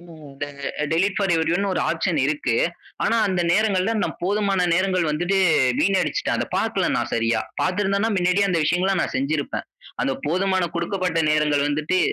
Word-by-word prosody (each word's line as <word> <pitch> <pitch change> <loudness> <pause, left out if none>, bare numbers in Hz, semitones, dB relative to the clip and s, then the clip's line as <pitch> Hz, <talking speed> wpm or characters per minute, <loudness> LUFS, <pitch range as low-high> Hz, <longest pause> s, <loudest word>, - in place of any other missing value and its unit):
இந்த 155 -5 -9 0.5
டெலிட் 190 +4 +1
பார் 195 -3 +1
எவரியோன்னு 175 +5 0
ஒரு - - 0
ஆப்ஷன் 165 0 -1
இருக்கு. 145 -5 -1 0.5
ஆனா, 230 - +2
அந்த 185 -2 0
நேரங்கள்ல 205 +1 +1
நான் - - -2
போதுமான 195 -1 +1
நேரங்கள் 185 -2 +1
வந்துட்டு 175 +6 0 0.4
வீணடிச்சுட்டேன். 185 -6 +1
அத - - 0
பார்க்கல - - 0
நான் - - -2
சரியா. 115 0 +1 0.2
பார்த்திருந்தேன்னா 200 +3 0
மின்னாடியே 185 +2 +2
அந்த 170 -2 +1
விஷயங்களல்லா 180 +4 +1
நான் - - -4
செஞ்சுருப்பேன். 140 +2 -2 0.4
அந்த 135 - 0
போதுமான 185 +4 +1
குடுக்கப்பட்ட 180 0 -1
நேரங்கள் 150 -1 +2
வந்துட்டு 155 +5 0
180 Hz, 150 wpm, -22 LUFS, 155-195 Hz, 0.5 s, ஆனா